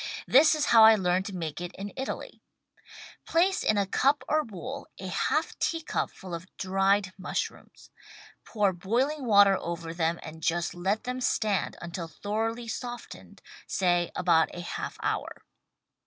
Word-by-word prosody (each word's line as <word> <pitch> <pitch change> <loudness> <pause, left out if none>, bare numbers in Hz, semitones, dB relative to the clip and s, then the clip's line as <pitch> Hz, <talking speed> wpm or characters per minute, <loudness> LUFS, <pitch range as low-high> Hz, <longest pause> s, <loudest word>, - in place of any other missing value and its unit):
This 305 +4 +6
is 305 - 0
how 225 -1 +9
I 220 0 +9
learned 185 -1 0
to 200 - -6
make 165 -2 -4
it 175 0 -6
in 200 +1 -7
Italy: 265 - -5 0.9
Place 370 +4 +2
in 215 - +2
a 200 - +2
cup 270 +7 +2
or 310 0 +2
bowl 250 - -7
a - - -6
half - - -1
teacup 325 -1 -1
full 185 -2 -10
of 170 +2 -6
dried 195 0 +1
mushrooms. 185 - -5 0.5
Pour 205 -4 +1
boiling 250 - -1
water 200 -3 +6
over 170 -1 -5
them 165 0 0
and 160 0 -9
just 170 +2 0
let 195 +6 -1
them 250 +1 -4
stand 210 -5 0
until 170 0 -5
thoroughly 225 +7 -3
softened, 240 +2 -7 0.2
say 175 -2 +1
— - - -44
about 170 -3 +3
a 175 - -5
half 175 - -5
hour. - - -3
195 Hz, 155 wpm, -28 LUFS, 175-240 Hz, 0.9 s, how